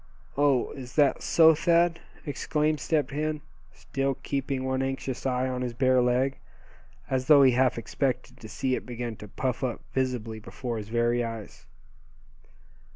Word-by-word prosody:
"Oh! 140 Hz, -3 st, +2 dB
is 125 Hz, -3 st, -9 dB
that 145 Hz, -3 st, +3 dB
so, 160 Hz, -1 st, +6 dB
Thad?" 170 Hz, +2 st, +2 dB, 0.3 s
exclaimed 150 Hz, +1 st, 0 dB
Step 150 Hz, +1 st, 0 dB
Hen, 150 Hz, +1 st, -2 dB, 0.3 s
still 135 Hz, -1 st, -2 dB
keeping 135 Hz, -1 st, -2 dB
one 130 Hz, 0 st, 0 dB
anxious 135 Hz, -1 st, -3 dB
eye 130 Hz, 0 st, 0 dB
on 125 Hz, -1 st, -3 dB
his 120 Hz, -2 st, -3 dB
bare 130 Hz, 0 st, +3 dB
leg, 125 Hz, +2 st, +1 dB, 0.7 s
as 130 Hz, -1 st, 0 dB
though 145 Hz, -2 st, +8 dB
he 130 Hz, -, +6 dB
half 125 Hz, 0 st, +2 dB
expected 125 Hz, +3 st, -2 dB
to 110 Hz, -, -10 dB
see 130 Hz, +4 st, -1 dB
it -, -, -1 dB
begin 120 Hz, -2 st, -5 dB
to 105 Hz, -, -10 dB
puff 130 Hz, +5 st, -3 dB
up 125 Hz, -2 st, -2 dB
visibly 125 Hz, -4 st, -2 dB
before 115 Hz, +1 st, -5 dB
his 105 Hz, 0 st, -8 dB
very 120 Hz, +1 st, +1 dB
eyes. 115 Hz, -2 st, -7 dB
130 Hz, 155 wpm, -27 LUFS, 120-140 Hz, 0.7 s, though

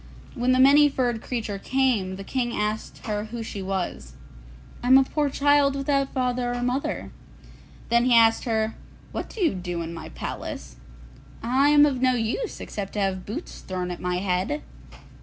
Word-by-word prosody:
When 250 Hz, -1 st, +1 dB
the 255 Hz, -, +4 dB
Many 285 Hz, +3 st, +7 dB
furred 245 Hz, -4 st, -1 dB
Creature 220 Hz, -5 st, -4 dB
came, 240 Hz, -7 st, +1 dB
the 195 Hz, -, -7 dB
King 240 Hz, +2 st, -2 dB
asked 210 Hz, +1 st, -3 dB
her 210 Hz, -1 st, -2 dB
who 230 Hz, +1 st, -6 dB
she 205 Hz, -2 st, -6 dB
was. 185 Hz, -, -4 dB, 0.7 s
'I 245 Hz, -, -3 dB
am 260 Hz, +1 st, +8 dB
a 270 Hz, -, +6 dB
poor 295 Hz, +2 st, 0 dB
child 285 Hz, 0 st, +3 dB
without 275 Hz, 0 st, 0 dB
father 250 Hz, -1 st, -1 dB
or 245 Hz, -, -3 dB
mother.' 250 Hz, +3 st, -2 dB, 0.8 s
Then 235 Hz, +1 st, +3 dB
he 250 Hz, -1 st, +5 dB
asked 225 Hz, -1 st, +5 dB
her, 220 Hz, -2 st, 0 dB, 0.4 s
'What -, -, -5 dB
do 445 Hz, -, -7 dB
you 335 Hz, -, +3 dB
do 175 Hz, -2 st, -4 dB
in 165 Hz, +1 st, -6 dB
my 165 Hz, -, -8 dB
palace?' 65 Hz, -3 st, -6 dB, 0.7 s
'I 260 Hz, +5 st, +3 dB
am 295 Hz, 0 st, +7 dB
of 265 Hz, -4 st, 0 dB
no 255 Hz, -1 st, +3 dB
use 240 Hz, -, -2 dB
except 200 Hz, -2 st, -6 dB
to 210 Hz, -, -2 dB
have 190 Hz, -2 st, -1 dB
boots 265 Hz, -, -6 dB
thrown 180 Hz, -1 st, -4 dB
at 175 Hz, -, -6 dB
my 180 Hz, 0 st, -1 dB
head. 185 Hz, +10 st, -1 dB
240 Hz, 180 wpm, -25 LUFS, 195-270 Hz, 0.8 s, am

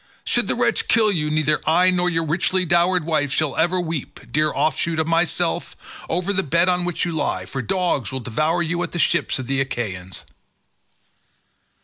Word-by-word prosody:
Should -, -, +1 dB
the -, -, 0 dB
wretch -, -, 0 dB
kill 220 Hz, -2 st, +4 dB
you, 150 Hz, -5 st, -1 dB
neither 155 Hz, -1 st, +1 dB
I 180 Hz, +3 st, +4 dB
nor 180 Hz, 0 st, +1 dB
your 165 Hz, -1 st, 0 dB
richly 180 Hz, +3 st, +1 dB
dowered 175 Hz, +1 st, +2 dB
wife 150 Hz, -4 st, 0 dB
shall 155 Hz, -1 st, 0 dB
ever 175 Hz, +4 st, +2 dB
weep, 165 Hz, -5 st, -4 dB
dear 155 Hz, +1 st, +2 dB
offshoot 160 Hz, +1 st, 0 dB
of 160 Hz, 0 st, 0 dB
myself, 165 Hz, -1 st, -2 dB
over 180 Hz, +4 st, 0 dB
the 190 Hz, -, +1 dB
bed 170 Hz, +2 st, +2 dB
on 180 Hz, -1 st, +1 dB
which 175 Hz, 0 st, -1 dB
you 175 Hz, -, -2 dB
lie, 160 Hz, -, -2 dB
for 135 Hz, -, -4 dB
dogs 175 Hz, -, -1 dB
will 130 Hz, -, -3 dB
devour 155 Hz, +9 st, 0 dB
you 170 Hz, +2 st, -2 dB
at -, -, -4 dB
the -, -, -2 dB
ships -, -, +1 dB
of 130 Hz, -, -4 dB
the 135 Hz, +1 st, 0 dB
Achaeans." 95 Hz, -9 st, -4 dB
165 Hz, 190 wpm, -22 LUFS, 150-180 Hz, -, kill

